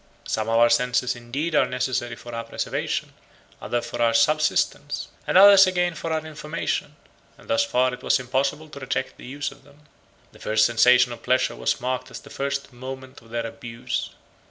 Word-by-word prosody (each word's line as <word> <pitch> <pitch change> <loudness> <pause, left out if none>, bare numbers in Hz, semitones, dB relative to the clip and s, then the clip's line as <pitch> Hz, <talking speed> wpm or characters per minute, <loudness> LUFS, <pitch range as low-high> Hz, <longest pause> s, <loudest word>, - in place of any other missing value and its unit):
88 - - -8
Some 110 0 -1
of 115 - +2
our 120 0 +6
senses 125 +1 +1
indeed 135 +8 -4
are 135 -3 +4
necessary 125 -2 -2
for 120 +1 -11
our 115 0 -4
preservation, - - -3 0.5
others 120 0 -2
for 120 0 -5
our 115 -1 +3
subsistence, 145 +2 +1 0.2
and - - +3
others 195 0 +9
again 180 -1 0
for 165 0 -5
our 160 0 -1
information; 150 -1 -4 0.4
and - - -18
thus 115 0 +2
far 125 +2 +1
it 125 - -8
was - - +2
impossible 135 +4 -1
to 145 -2 -10
reject 130 -1 -3
the - - -11
use 145 +3 -4
of 135 0 -17
them. 145 +2 -21 0.5
The - - -18
first 110 0 +2
sensation 125 +1 +5
of 115 - -11
pleasure 130 +1 +1
was - - -1
marked 130 0 -3
as - - -8
the - - -15
first 140 -1 -3
moment 130 +1 -9
of 115 - -19
their 115 0 -3
abuse. 115 +1 -5
130 Hz, 195 wpm, -24 LUFS, 120-145 Hz, 0.5 s, others